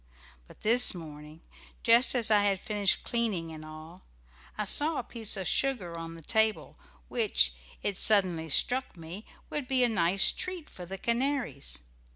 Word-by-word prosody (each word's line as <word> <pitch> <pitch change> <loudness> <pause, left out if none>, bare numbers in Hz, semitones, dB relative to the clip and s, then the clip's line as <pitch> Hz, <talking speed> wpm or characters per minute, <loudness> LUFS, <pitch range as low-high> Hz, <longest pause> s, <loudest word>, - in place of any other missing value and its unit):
But - - -18
this 235 -1 +5
morning, 155 -1 -11 0.4
just 235 +3 +5
as 230 -3 +2
I 210 -1 +5
had 200 -2 0
finished 205 -1 -1
cleaning 210 -9 -2
and 155 -1 -10
all, 155 +3 -12 0.6
I 210 - -3
saw 295 +9 +2
a - - -3
piece 225 -3 -5
of 190 -3 -3
sugar 230 -12 0
on 165 0 -8
the 165 - -13
table, 220 +3 -1 0.3
which, - - +1 0.3
it 200 -2 -2
suddenly 185 -7 +3
struck 250 - 0
me 170 +6 -10 0.2
would 290 -4 -4
be 260 -1 +1
a 245 - +2
nice 190 -2 +3
treat 365 -4 -4
for 180 -1 -10
the 195 +2 -7
canaries. 235 - -2
200 Hz, 165 wpm, -28 LUFS, 165-235 Hz, 0.6 s, this